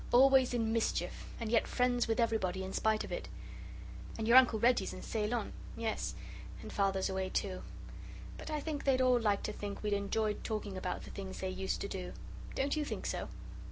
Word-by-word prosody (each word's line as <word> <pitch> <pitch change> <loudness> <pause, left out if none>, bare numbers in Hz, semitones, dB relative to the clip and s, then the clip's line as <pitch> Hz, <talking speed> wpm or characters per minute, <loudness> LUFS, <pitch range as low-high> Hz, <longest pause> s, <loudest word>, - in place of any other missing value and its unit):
Always 265 0 +6
in 225 -2 +1
mischief, 230 -1 -1
and 225 -2 -3
yet 230 - +3
friends 245 -1 +2
with 225 +1 0
everybody 195 -5 +1
in 190 0 -5
spite 220 -1 +2
of - - -8
it. - - -4 0.9
And 220 -1 -2
your 235 - +6
Uncle 250 -3 +8
Reggie's 240 +3 +3
in - - -8
Ceylon 220 +1 -1 0.2
yes, 225 -1 -2 0.5
and - - -7
Father's 195 -1 +2
away, 190 -1 -1
too. 190 -2 -2 0.8
But - - -7
I 305 -1 -1
think 295 -1 -3
they'd 265 -2 +3
all 255 -1 +5
like 205 -3 +1
to 210 - -2
think 205 0 -5
we'd 210 -1 +1
enjoyed 210 +1 0
talking 210 -3 -3
about 185 -1 -3
the - - -9
things 190 -1 -6
they 190 0 -1
used 190 +1 -2
to - - -2
do. 185 -2 -5 0.4
Don't 280 +2 +1
you 305 - 0
think - - -4
so?" - - -2
220 Hz, 195 wpm, -34 LUFS, 195-245 Hz, 0.9 s, Uncle